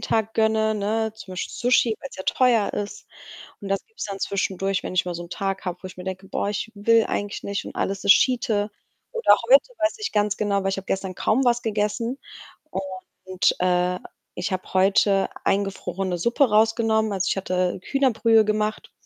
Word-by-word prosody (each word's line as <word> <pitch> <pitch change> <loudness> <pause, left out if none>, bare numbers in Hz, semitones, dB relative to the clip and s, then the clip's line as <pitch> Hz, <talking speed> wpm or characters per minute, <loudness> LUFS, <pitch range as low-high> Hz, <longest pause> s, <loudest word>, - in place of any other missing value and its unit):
Tag 220 -1 0
gönne, 220 0 +2
ne, 220 +1 -1
zum 195 -4 -10
Beispiel 185 - -4
Sushi, 245 -2 +2
weil's 275 - -9
ja 190 - -5
teuer 240 -4 +2
ist 205 - -5 0.5
und 200 - -7
das 195 0 -1
gibt's 445 - -7
dann 200 -1 -6
zwischendurch, 195 -1 -1
wenn - - -5
ich 180 - +2
mal 175 -1 -4
so 175 - -5
’n - - -13
Tag 195 -1 -3
habe, 180 -1 -2
wo - - -6
ich 185 - -11
mir 180 - -7
denke: 190 +1 -6
„Boah, - - -2
ich 210 +2 -3
will 225 +2 +4
eigentlich 205 0 -3
nicht 200 0 -3
und - - -9
alles 195 0 -2
ist 200 - +9
Schiete.“ 225 -5 +1 0.4
Oder 465 -1 +5
heute, - - +6
weiß 320 +7 0
ich 430 - -3
ganz 210 -1 0
genau, 200 -2 0
weil 195 - 0
ich 195 - -2
habe 195 - -8
gestern 190 -1 -2
kaum 250 +8 +1
was 240 0 +3
gegessen, 220 +4 -1 1.1
und, 185 -1 +1
äh, 180 0 +1 0.4
ich 180 +3 -3
habe 185 0 -4
heute 195 +1 +3 0.2
eingefrorene 195 -2 -1
Suppe 240 - +2
rausgenommen, 220 0 +2
also, 195 -1 -1
ich - - 0
hatte 185 -1 -1
Hühnerbrühe 230 -5 +3
gemacht 215 0 -1
205 Hz, 190 wpm, -24 LUFS, 195-225 Hz, 1.1 s, ist